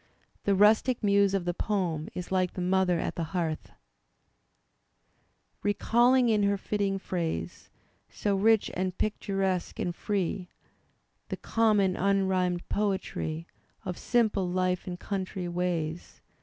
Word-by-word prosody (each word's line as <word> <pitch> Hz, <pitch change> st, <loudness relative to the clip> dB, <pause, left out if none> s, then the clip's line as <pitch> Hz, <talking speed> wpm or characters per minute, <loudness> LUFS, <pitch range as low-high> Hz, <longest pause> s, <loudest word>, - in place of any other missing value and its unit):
The 200 Hz, -, +3 dB
rustic 220 Hz, +5 st, +4 dB
muse 200 Hz, -1 st, +4 dB
of 185 Hz, -3 st, -1 dB
the 175 Hz, -, 0 dB
poem 175 Hz, -6 st, -1 dB
is 180 Hz, 0 st, -6 dB
like 185 Hz, -1 st, +1 dB
the -, -, -6 dB
mother 180 Hz, -1 st, +2 dB
at -, -, -2 dB
the 170 Hz, -, -3 dB
hearth 160 Hz, -3 st, -2 dB, 1.9 s
Recalling 240 Hz, +5 st, +3 dB
in 215 Hz, -2 st, +3 dB
her 200 Hz, 0 st, +2 dB
fitting 200 Hz, 0 st, -1 dB
phrase. 165 Hz, -, -4 dB, 0.4 s
So 205 Hz, -1 st, -1 dB
rich 220 Hz, +2 st, +3 dB
and 185 Hz, 0 st, -2 dB
picturesque 195 Hz, -3 st, -1 dB
and 175 Hz, -1 st, -2 dB
free, 190 Hz, -2 st, -2 dB, 0.8 s
(The -, -, -3 dB
common 210 Hz, -5 st, +2 dB
unrhymed 190 Hz, -2 st, +1 dB
poetry 190 Hz, -5 st, -2 dB, 0.4 s
Of 180 Hz, -, -3 dB
simple 215 Hz, -6 st, +1 dB
life 180 Hz, 0 st, 0 dB
and 175 Hz, -1 st, -5 dB
country 190 Hz, -2 st, -3 dB
ways). 175 Hz, -2 st, -3 dB
190 Hz, 125 wpm, -28 LUFS, 180-205 Hz, 1.9 s, rustic